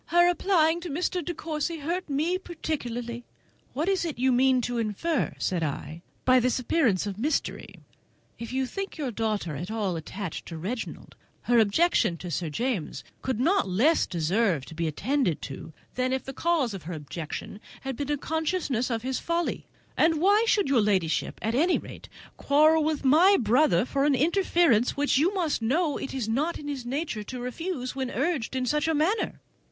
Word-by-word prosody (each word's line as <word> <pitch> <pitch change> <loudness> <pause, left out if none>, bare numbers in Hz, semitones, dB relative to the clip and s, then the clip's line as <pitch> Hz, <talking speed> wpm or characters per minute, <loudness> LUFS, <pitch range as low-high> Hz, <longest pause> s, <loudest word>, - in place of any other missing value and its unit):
Her 345 +1 +5
applying 345 -2 +2
to 350 - -6
Mr. 355 +4 -1
De 350 - -3
Courcy 315 +1 -3
hurt 335 +4 -3
me 315 +6 0
particularly." 245 -9 -4 0.5
"What 305 +6 -1
is 390 -2 +1
it 325 -7 -3
you 260 +2 +2
mean 255 +1 +4
to 245 0 -2
infer," 230 - -1
said 180 -3 -1
I, 155 +1 -4 0.2
"by 255 0 +6
this 250 0 +1
appearance 245 - +1
of 200 -1 -5
mystery? 290 +5 -2 0.6
If 230 +1 -6
you 265 +1 0
think 390 +9 -5
your 280 -5 -2
daughter 210 -8 -2
at 175 +7 -5
all 210 -5 -1
attached 175 +3 -6
to 165 - -6
Reginald, 215 +9 -5 0.3
her 240 -1 +4
objecting 220 - +3
to 175 +1 -7
Sir 165 +2 -2
James 220 - -2 0.2
could 260 -4 -2
not 330 - +2
less 255 - +3
deserve 175 - 0
to 160 - -11
be 165 +1 -2
attended 200 - 0
to 135 +3 -7 0.2
than 255 0 0
if 265 - -1
the 270 - -7
cause 305 -6 +1
of 195 - -6
her - - -3
objecting 155 +6 -6 0.2
had 270 -1 -4
been 285 +3 -4
a 295 - +1
consciousness 310 -5 -1
of 230 -2 -2
his 260 0 -2
folly; 340 0 -2 0.3
and 320 -1 +3
why 405 +6 +4
should 410 -6 +3
your 270 -4 +3
ladyship, 190 -6 0
at 225 - 0
any 330 +9 +3
rate, - - -10 0.3
quarrel 310 +2 +4
with 305 -2 -1
my 350 +9 +6
brother 230 - +3
for 275 +1 0
an 290 -2 +4
interference 325 - +2
which, 285 -2 +2
you 335 +6 +3
must 330 -9 0
know, 290 +7 +1
it - - -5
is 255 -5 -3
not 290 +10 0
in 290 - -9
his 270 -4 -4
nature 275 -4 -2
to 250 +4 -7
refuse 255 +2 -4
when 265 -2 -2
urged 275 -3 -1
in 255 -1 0
such 300 +4 +1
a 320 - +2
manner?" 340 +9 0
265 Hz, 190 wpm, -27 LUFS, 220-320 Hz, 0.6 s, by